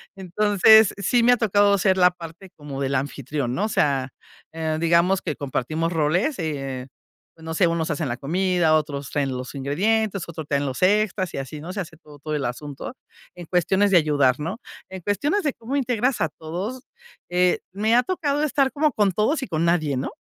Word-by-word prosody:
Entonces, 205 +3 +4
sí 230 +5 +2
me 245 +1 +6
ha - - +1
tocado 205 -2 +3
ser 190 0 +2
la 180 -1 +5
parte 175 +1 -11
como 140 -2 -7
del 135 0 -1
anfitrión, 135 -1 -3
¿no? 200 - 0
O - - -2
sea, 135 -8 0 0.4
eh, 160 -1 -2
digamos 170 +3 +3
que 155 -5 -3
compartimos 155 +5 -2
roles, 175 - 0
eh, 135 -5 -4 0.5
no 160 0 -6
sé, 175 +1 +3
unos 165 -1 -1
hacen 150 -3 -2
la 120 - -3
comida, 175 +2 +1
otros 145 -3 -1
traen 140 -2 0
los 125 +2 -7
ingredientes, 195 +8 0
otros 160 -3 -7
traen 140 -1 0
los 130 -1 -4
extras 200 -1 +2
y - - -4
así 135 +2 -6
¿no? 170 +4 -7
Se 200 - -5
hace 160 -2 -9
todo 150 -2 -16
todo 155 +2 -6
el 150 -2 -1
asunto 145 - -6 0.4
en 175 -1 -9
cuestiones 190 +4 +1
de 185 - +6
ayudar, 145 -5 +2
¿no? 170 +8 -4 0.3
En 190 -1 -8
cuestiones 290 - 0
de 290 - 0
cómo 235 +4 -6
integras 250 -2 0
a 160 - +1
todos, 180 - -6 0.5
eh, 180 0 +2
me 215 +3 +1
ha 245 - +6
tocado 295 -3 -1
estar 275 -3 +1
como 300 0 +1
con 205 -4 +2
todos 245 - 0
y - - -5
con 165 -1 -1
nadie, 155 -5 +1
¿no? 130 - -3
170 Hz, 200 wpm, -23 LUFS, 150-205 Hz, 0.5 s, me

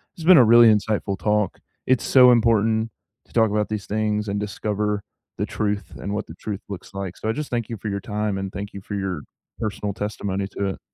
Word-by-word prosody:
it's 165 - -9
been 180 -2 +8
a 125 - +8
really 115 +1 +8
insightful 105 -2 -1
talk. 105 0 0 0.3
It's 130 -1 +2
so 125 -2 +7
important 115 -1 +3 0.4
to - - -25
talk 110 -3 +3
about 105 0 0
these 105 -2 -3
things 105 0 -1
and 100 0 -1
discover 105 0 -2 0.3
the - - -1
truth 105 -1 -2
and 100 - -5
what 105 - -2
the 80 - -10
truth 105 +3 -6
looks 100 0 -8
like 95 -2 -5
so, 110 - -3
I - - +3
just 150 +3 -4
thank 120 -2 -2
you 115 - -4
for 105 +2 -5
your 100 0 -3
time, 105 -1 -2
and 95 0 -4
thank 100 0 -6
you 100 - -7
for 100 - -6
your 95 -6 -2 0.4
personal 105 -2 -3
testimony 100 -2 -3
to 100 - 0
it. - - -6
105 Hz, 225 wpm, -23 LUFS, 100-110 Hz, 0.4 s, been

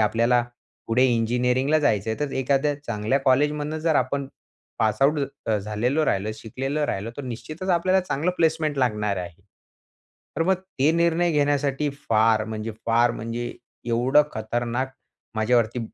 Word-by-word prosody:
आपल्याला 115 +3 +3 0.4
पुढे 125 +3 +3
इंजिनिअरिंगला 125 +5 +2
जायचं 110 -7 +1
आहे 110 - -3
तर 145 -2 -2
एखाद्या 140 +2 +1
चांगल्या 115 +1 0
कॉलेजमधनं 150 +3 +1
जर 160 0 +1
आपण, 135 +2 0 0.5
पास 110 +2 +1
आउट 150 +2 +4 0.3
अ, 110 -1 +2
झालेलं 110 +9 0
राहिलं, 100 -2 0
शिकलेलं 135 +7 -3
राहिलं 105 -4 -3
तर 145 - -5
निश्चितच 155 +9 -6
आपल्याला 185 +2 +3
चांगला 180 -1 -1
प्लेसमेंट 160 -2 +1
लागणार 105 -5 0
आहे. 90 -1 -7 1.0
तर 165 - +2
मग 190 +2 +3 0.2
ते 140 +4 +4
निर्णय 170 +1 +2
घेण्यासाठी 145 -1 +1 0.2
फार 110 -1 +3
म्हणजे, 110 0 -5 0.2
फार 115 +1 +4
म्हणजे 115 +1 -4 0.3
एवढं 120 +5 +3
खतरनाक, 120 +4 -2 0.5
माझ्यावरती 115 +1 +1
125 Hz, 140 wpm, -24 LUFS, 110-150 Hz, 1.0 s, आउट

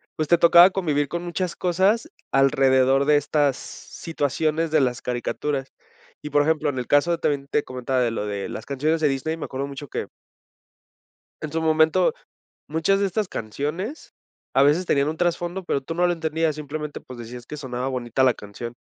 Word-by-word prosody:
pues, 155 - -2
te 170 - +5
tocaba 170 +2 +8
convivir 155 -7 0
con 170 +4 -4
muchas 175 0 -3
cosas 190 +5 +1 0.2
alrededor 135 0 +4
de 150 0 +5
estas 145 -2 +1
situaciones 160 +1 -3
de 155 - +4
las 125 -2 0
caricaturas, 135 +3 -3 0.5
y, 150 - -6
por 145 0 +3
ejemplo, 155 0 +1
en 130 -3 -3
el 125 - -5
caso 145 +4 +3
de 170 - +1
también 140 -3 -1
te 145 - 0
comentaba 130 +1 -2
de 120 -2 +1
lo 110 -2 -3
de 100 -1 -3
las 110 - -7
canciones 155 +4 0
de 155 - +4
Disney, 150 +4 -2
me 160 - -5
acuerdo 135 +1 -4
mucho 140 +1 -8
que - - -4 1.3
en 155 - -5
su 165 - -1
momento, 160 - +3 0.5
muchas 165 +6 +1
de 200 - +2
estas 205 +1 -2
canciones 150 - -5 0.4
a 135 - +5
veces 150 +6 +4
tenían 140 -2 +2
un 155 - -3
trasfondo, 175 +2 -1
pero 140 - 0
tú 165 +5 -5
no 175 +1 +2
lo 175 - +2
entendías 160 -1 -1
simplemente, 150 0 -6
pues, 125 -1 -11
decías 120 +1 -9
que 150 - -7
sonaba 130 -3 -4
bonita 125 -1 -1
la 130 -2 +4
canción 110 +4 -8
150 Hz, 190 wpm, -23 LUFS, 135-165 Hz, 1.3 s, tocaba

